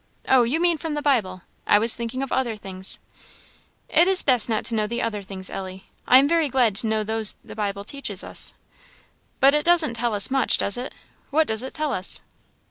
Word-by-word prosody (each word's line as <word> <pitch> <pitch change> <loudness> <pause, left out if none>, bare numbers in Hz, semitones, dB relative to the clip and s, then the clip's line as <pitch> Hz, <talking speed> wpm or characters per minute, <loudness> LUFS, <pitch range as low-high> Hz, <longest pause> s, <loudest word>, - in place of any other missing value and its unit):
"Oh, 260 -1 +5
you 245 +7 0
mean 340 -2 +2
from 315 -1 -4
the 295 - -3
Bible 195 -11 0 0.2
I - - +5
was 225 +2 +3
thinking 235 +3 -4
of 275 - -7
other 240 -4 -1
things." 190 -2 -6 0.9
"It 340 +3 +4
is 380 -1 +4
best 250 -4 +2
not 220 -2 -1
to - - +3
know 215 -1 0
the 235 +2 -4
other 210 -3 -3
things, 190 -1 -8
Ellie 190 0 -8 0.2
I 255 - +7
am 275 +2 +4
very 325 -2 +1
glad 245 -5 +2
to 225 - +1
know 220 0 0
those 220 -1 +2
the - - -11
Bible 200 -2 -3
teaches 210 -5 -4
us." - - -6 0.8
"But 275 +1 +5
is 300 - +2
doesn't 340 -7 +3
tell 235 -1 -2
us 205 +4 +2
much, 270 -1 +3
does 200 - +1
it? 250 +2 -6 0.3
What 315 +3 +2
does 220 -3 -2
it 260 - -8
tell 305 -2 -2
us?" 185 +1 -1
235 Hz, 215 wpm, -23 LUFS, 210-275 Hz, 0.9 s, I